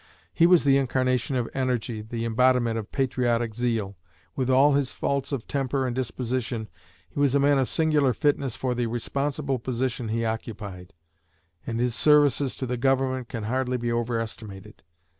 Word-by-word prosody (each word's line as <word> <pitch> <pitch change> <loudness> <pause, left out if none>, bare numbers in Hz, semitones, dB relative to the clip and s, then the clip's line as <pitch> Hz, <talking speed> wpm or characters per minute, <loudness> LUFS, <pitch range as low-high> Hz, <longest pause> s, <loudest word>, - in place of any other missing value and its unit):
He 170 - +5
was 180 -1 +5
the 140 -1 +5
incarnation 130 0 0
of 120 -2 0
energy, 125 -4 -1
the 115 +1 -4
embodiment 120 0 +2
of 105 - -8
patriotic 120 -4 0
zeal. 110 -5 -2 0.4
With 130 -1 -1
all 135 +3 +5
his 140 -2 +1
faults 140 0 -2
of 135 -5 -4
temper 135 -1 -1
and 125 -2 -2
disposition, 125 -3 -3 0.4
he - - -7
was 140 -1 +3
a - - +4
man 140 0 +4
of 130 - +1
singular 150 -4 +2
fitness 140 -2 0
for 130 -1 -1
the 120 -1 -1
responsible 140 +3 -2
position 125 0 -2
he 115 +1 -1
occupied, 100 -5 -5 0.7
and 115 0 -2
his 120 0 +1
services 145 +1 +3
to 130 - -4
the 125 0 -2
Government 130 -1 0
can 115 -4 -5
hardly 125 +3 -1
be 120 -1 -2
overestimated. 115 -3 -4
125 Hz, 165 wpm, -26 LUFS, 115-135 Hz, 0.7 s, He